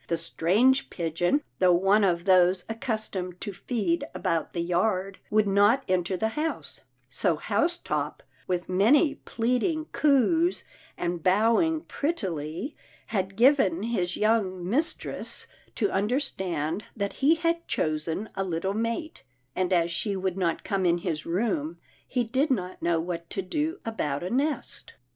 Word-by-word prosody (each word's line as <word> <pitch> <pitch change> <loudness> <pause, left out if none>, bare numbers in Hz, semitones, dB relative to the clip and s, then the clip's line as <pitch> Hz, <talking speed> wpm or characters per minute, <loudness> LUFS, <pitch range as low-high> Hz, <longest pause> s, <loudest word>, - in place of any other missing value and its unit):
The 170 - 0
strange 205 +11 +2
pigeon, 175 - 0 0.2
though 180 -2 +5
one 195 +4 +4
of 175 -2 +1
those 185 -1 +4
accustomed 215 -6 -3
to 205 - -4
feed 190 -5 -1
about 165 -2 -1
the 170 - -1
yard, 185 +2 0
would 215 -1 +3
not 205 +7 +4
enter 185 0 0
the 220 +4 0
house, 310 +7 -3 0.3
so - - +1
Housetop, 345 +2 -1 0.2
with 180 -1 -1
many 245 - +4
plead 245 -2 -1
ing 315 +1 -1
coos, 305 - +3 0.3
and 175 -1 -2
bowing 230 - +3
prettily, 190 - -3 0.4
had 190 -1 -1
given 225 - +4
his 185 -6 -1
young 195 -5 +1
mistress 285 - -2 0.3
to 390 - 0
understand 190 - -1
that 200 -1 -2
he 300 +5 +5
had 335 +1 -1
chosen 160 +6 -1
a 195 - -2
little 185 +1 -2
mate, 230 - -3 0.3
and 185 0 0
as 170 -2 +2
she 200 +4 -1
would 190 -1 -1
not 180 -3 -1
come 195 -2 -1
in 175 -1 +3
his 160 -3 -4
room 170 -4 -1 0.3
he 250 -2 0
did 260 +7 0
not 185 -8 -2
know 170 -1 +2
what 170 0 -4
to 195 - -3
do 310 - -2
about 150 -10 -2
a 180 - -3
nest. 285 +4 -2
195 Hz, 145 wpm, -27 LUFS, 175-245 Hz, 0.4 s, though